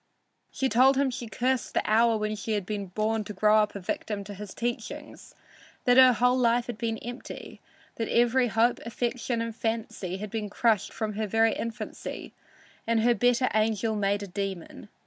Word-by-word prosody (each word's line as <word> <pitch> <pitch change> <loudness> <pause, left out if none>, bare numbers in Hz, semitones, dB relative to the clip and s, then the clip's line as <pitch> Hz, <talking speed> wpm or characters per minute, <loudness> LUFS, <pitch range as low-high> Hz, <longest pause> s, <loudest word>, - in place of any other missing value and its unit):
She 265 - -1
told 260 +3 +5
him 275 -1 +2
she 240 -1 -6
cursed 250 +2 -1
the - - +2
hour 225 +1 +4
when 215 0 -2
she 215 +2 -3
had 205 -3 -1
been 205 -1 -4
born 215 +4 -1
to 210 - -6
grow 210 +2 +4
up 210 -1 +2
a - - -4
victim 200 +2 -4
to 205 +1 -8
his 205 0 -9
teachings; 240 0 -5 0.5
that 245 -1 +5
her 260 -1 +8
whole 250 +2 +2
life 235 0 +3
had 235 -3 -6
been 225 -1 -1
empty; 240 +3 -9 0.4
that 225 - -2
every 240 +2 +3
hope, 230 +2 +2
affection 235 0 -2
and 230 -1 -5
fancy 225 -5 -3
had 205 0 -6
been 215 -2 -3
crushed 220 0 +1
from 215 -1 -3
her 215 +1 -2
very 225 +2 +3
infancy 230 -1 -6 0.5
and 230 -1 +2
her 240 +2 +4
better 245 +3 +2
angel 220 0 +1
made 205 0 0
a - - -6
demon. 195 -2 -5
225 Hz, 185 wpm, -27 LUFS, 210-240 Hz, 0.5 s, her